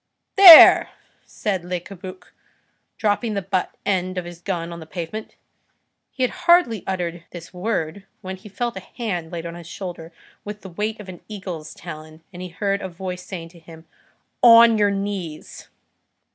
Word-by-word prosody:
"There!" 375 Hz, -5 st, +10 dB, 0.4 s
said 195 Hz, -5 st, -3 dB
Le 180 Hz, 0 st, -3 dB
Cabuc, 185 Hz, +1 st, -12 dB, 0.6 s
dropping 215 Hz, +1 st, -1 dB
the 200 Hz, -, -2 dB
butt 185 Hz, -1 st, -2 dB
end 185 Hz, -2 st, -1 dB
of 180 Hz, -, -3 dB
his 175 Hz, 0 st, -11 dB
gun 170 Hz, -3 st, -4 dB
to 170 Hz, -, -7 dB
the 160 Hz, -2 st, -11 dB
pavement. 180 Hz, +6 st, -7 dB, 0.7 s
He 260 Hz, -, -4 dB
had 250 Hz, -, +1 dB, 0.2 s
hardly 340 Hz, -, +4 dB
uttered 175 Hz, -2 st, -4 dB
this 175 Hz, 0 st, -11 dB
word, 190 Hz, -1 st, -4 dB
when 190 Hz, 0 st, -7 dB
he 200 Hz, +3 st, -14 dB
felt 235 Hz, +4 st, -4 dB
a -, -, -5 dB
hand 185 Hz, -6 st, -6 dB
laid 170 Hz, -1 st, -6 dB
on 170 Hz, -, -6 dB
his 170 Hz, -1 st, -11 dB
shoulder 175 Hz, -3 st, -8 dB, 0.3 s
with 210 Hz, 0 st, -8 dB
the 190 Hz, -, -10 dB
weight 210 Hz, +5 st, -4 dB
of 210 Hz, -, -10 dB
an 180 Hz, -2 st, -10 dB
eagle's 185 Hz, -7 st, -8 dB
talon, 155 Hz, +1 st, -11 dB
and 180 Hz, -, -9 dB
he 185 Hz, -, -7 dB
heard 200 Hz, +3 st, -2 dB
a 190 Hz, -, -5 dB
voice 180 Hz, +1 st, -7 dB
saying 175 Hz, -3 st, -8 dB
to 170 Hz, 0 st, -18 dB
him:— 160 Hz, 0 st, -15 dB, 0.6 s
"On 230 Hz, -1 st, +8 dB
your 205 Hz, -1 st, +3 dB
knees." 195 Hz, -5 st, -6 dB
185 Hz, 175 wpm, -21 LUFS, 170-205 Hz, 0.7 s, There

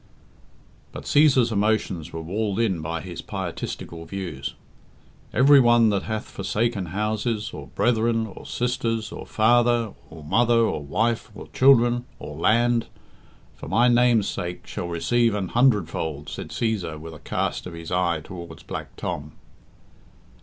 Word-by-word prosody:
But -, -, -8 dB
Cæsar's 135 Hz, -5 st, +4 dB
emotions 100 Hz, -6 st, 0 dB
were 80 Hz, 0 st, -6 dB
walled 100 Hz, +4 st, -2 dB
in 95 Hz, -8 st, +1 dB
by 80 Hz, +1 st, -3 dB
his 90 Hz, -3 st, -7 dB
pietistical 85 Hz, -1 st, -5 dB
views. 85 Hz, -8 st, -5 dB, 0.8 s
"Every 140 Hz, +2 st, +6 dB
one 120 Hz, -2 st, +5 dB
that 100 Hz, -2 st, 0 dB
hath 110 Hz, -1 st, -4 dB
forsaken 105 Hz, 0 st, -2 dB
houses, 105 Hz, +3 st, -2 dB
or 70 Hz, -2 st, -8 dB
brethren, 115 Hz, -, +1 dB
or 105 Hz, -, -10 dB
sisters, 115 Hz, -3 st, -1 dB
or -, -, -8 dB
father, 120 Hz, 0 st, +3 dB, 0.2 s
or 80 Hz, -1 st, -11 dB
mother, 115 Hz, +9 st, +3 dB
or 115 Hz, -9 st, +2 dB
wife, 110 Hz, +11 st, 0 dB
or -, -, -10 dB
children, 120 Hz, -2 st, +4 dB
or 75 Hz, 0 st, -8 dB
land, 115 Hz, +7 st, +2 dB, 0.7 s
for -, -, -9 dB
My 120 Hz, +2 st, +3 dB
name's 120 Hz, -3 st, +4 dB
sake, 90 Hz, 0 st, -4 dB
shall 90 Hz, -, -5 dB
receive 115 Hz, +7 st, +1 dB
an 95 Hz, -4 st, -2 dB
hundredfold," 85 Hz, -, +1 dB
said -, -, -6 dB
Cæsar, 95 Hz, -9 st, -2 dB
with 80 Hz, +1 st, -9 dB
a 75 Hz, -, -11 dB
cast -, -, -2 dB
of 90 Hz, -, -8 dB
his 85 Hz, -1 st, -8 dB
eye 85 Hz, -3 st, +1 dB
towards 85 Hz, -1 st, -9 dB
Black -, -, -7 dB
Tom. 75 Hz, 0 st, -5 dB
105 Hz, 145 wpm, -24 LUFS, 85-120 Hz, 0.8 s, Every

